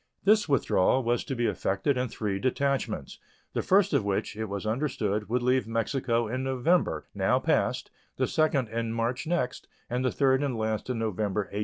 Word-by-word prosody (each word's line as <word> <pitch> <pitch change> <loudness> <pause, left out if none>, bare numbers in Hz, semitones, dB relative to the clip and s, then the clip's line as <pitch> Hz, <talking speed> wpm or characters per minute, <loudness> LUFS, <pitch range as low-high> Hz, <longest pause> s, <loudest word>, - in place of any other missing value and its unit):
This 210 -3 +4
withdrawal 130 -2 +3
was 120 +1 +1
to 135 - -3
be 120 -1 0
effected 100 +6 0
in 125 0 0
three 105 -4 -3
detachments, 130 - -1 0.3
the - - 0
first 195 0 +3
of - - +3
which, 100 +1 -2
it 110 +1 -3
was 100 0 -5
understood, 110 -4 -1
would 120 +1 0
leave 125 -1 +2
Mexico 115 +1 0
in 130 +4 -3
November, 135 +7 +1
now - - +2
past, - - 0 0.3
the - - +2
second 145 -5 +1
in 115 0 -2
March 120 +6 -2
next, 170 -7 -1 0.2
and 125 +1 0
the 130 - +1
third 135 -1 +2
and 135 -5 -1
last 110 +1 -2
in 125 - -1
November, 105 -2 -1
1867. 100 +1 -5
120 Hz, 185 wpm, -28 LUFS, 110-135 Hz, 0.3 s, This